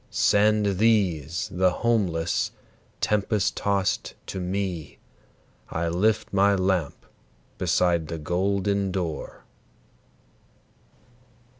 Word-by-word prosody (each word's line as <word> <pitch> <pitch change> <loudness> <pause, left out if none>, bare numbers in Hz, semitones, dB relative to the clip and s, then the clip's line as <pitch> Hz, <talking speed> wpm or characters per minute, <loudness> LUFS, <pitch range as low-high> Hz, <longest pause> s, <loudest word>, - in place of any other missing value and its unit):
Send 105 -2 +2
these, 90 -8 +1
the 90 +1 +3
homeless, 90 -5 0 0.5
tempest 105 -1 +1
tost 100 -1 -1
to 95 - -5
me, 90 -3 -3 0.7
I 85 0 -2
lift 100 +7 +1
my 100 +1 +4
lamp 95 -5 -1 0.5
beside 85 -3 +1
the 80 - -4
golden 100 +4 0
door!" 85 -5 -4
95 Hz, 85 wpm, -25 LUFS, 85-100 Hz, 0.7 s, my